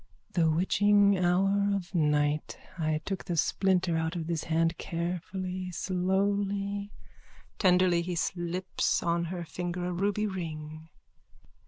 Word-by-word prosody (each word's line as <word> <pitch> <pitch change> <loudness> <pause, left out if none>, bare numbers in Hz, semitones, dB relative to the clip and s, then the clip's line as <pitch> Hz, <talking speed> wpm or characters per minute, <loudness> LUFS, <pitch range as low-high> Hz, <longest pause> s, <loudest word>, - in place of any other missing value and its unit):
_ - - -32
The 165 -3 +3
witching 200 +4 +4
hour 195 +3 +2
of 190 -1 -5
night. 150 -2 +1 0.2
I 155 -3 -1
took 195 -2 -4
the 175 - -2
splinter 180 0 +2
out 160 +2 -1
of 165 -2 -3
this 165 -1 -2
hand, 165 0 +1
carefully, 180 +2 -3
slowly. 200 +3 -1 0.7
_(Tenderly, 180 -2 +4
as 170 - -3
he 180 - -2
slips 175 +2 -1
on 170 0 +1
her 175 0 -5
finger 175 +1 -4
a 180 - -2
ruby 205 +4 0
ring.) 160 -4 -6
180 Hz, 135 wpm, -29 LUFS, 165-190 Hz, 0.7 s, witching